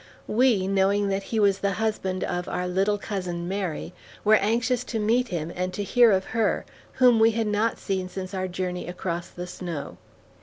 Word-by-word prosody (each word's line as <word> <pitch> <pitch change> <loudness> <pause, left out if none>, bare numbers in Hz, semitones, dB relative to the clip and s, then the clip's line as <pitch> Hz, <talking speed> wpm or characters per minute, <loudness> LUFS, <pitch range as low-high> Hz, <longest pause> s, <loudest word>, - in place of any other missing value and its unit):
We, 225 -5 +3
knowing 195 +1 +2
that 195 0 0
he 225 - 0
was 200 -2 +3
the 200 -1 0
husband 190 -2 -1
of 175 0 -3
our 180 - -2
"little 195 +3 +1
cousin 180 -4 -4
Mary," 185 -3 -3 0.3
were 215 - +5
anxious 235 +4 +1
to 230 - -3
meet 230 +4 +2
him 170 -4 -4
and 185 +1 -2
to 205 - -2
hear 235 +3 +5
of 190 -1 +2
her, 225 -3 +1 0.3
whom 250 -3 +5
we 225 +1 +6
had 225 0 0
not 210 +2 +1
seen 190 -2 -3
since 185 0 -6
our 185 -1 -2
journey 180 0 -4
across 175 -1 -4
the 180 - -7
snow. 175 -4 -6
195 Hz, 190 wpm, -25 LUFS, 180-220 Hz, 0.3 s, we